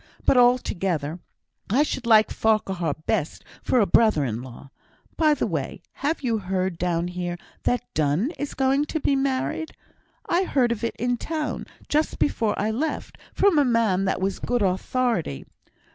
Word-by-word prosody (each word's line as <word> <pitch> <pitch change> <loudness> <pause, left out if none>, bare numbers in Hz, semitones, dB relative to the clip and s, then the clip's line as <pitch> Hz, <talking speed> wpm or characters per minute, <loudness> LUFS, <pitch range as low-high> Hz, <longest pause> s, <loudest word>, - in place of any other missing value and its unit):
But, - - +4
altogether, 190 - +2 0.5
I 255 +9 +4
should 260 -5 -4
like 220 -2 +5
Farquhar 190 -8 0
best 150 - -1 0.2
for 255 - +2
a 210 - +4
brother 215 -10 +3
in 115 -1 -3
law. 130 +2 -11 0.4
By 310 -2 +3
the - - -1
way, 165 -1 -4 0.2
have 290 +2 -1
you 230 -3 +1
heard 185 -2 -2
down 175 -1 0
here 175 -1 -4 0.3
that 245 0 +1
Donne 155 - +1
is 290 - -4
going 270 +2 +2
to 315 - -3
be 280 - +1
married? 270 +4 -1 0.5
I 345 - +2
heard 255 -8 +2
of 235 -1 -3
it 230 - -1
in 245 +1 -1
town, 310 +2 -3 0.2
just 305 +1 0
before 225 -7 0
I 215 +2 0
left, 300 +8 -3
from 390 -6 +3
a - - +5
man 225 -7 +2
that 190 - 0
was 190 0 -1
good 245 -3 0
authority. 190 - -1
225 Hz, 165 wpm, -24 LUFS, 180-265 Hz, 0.5 s, like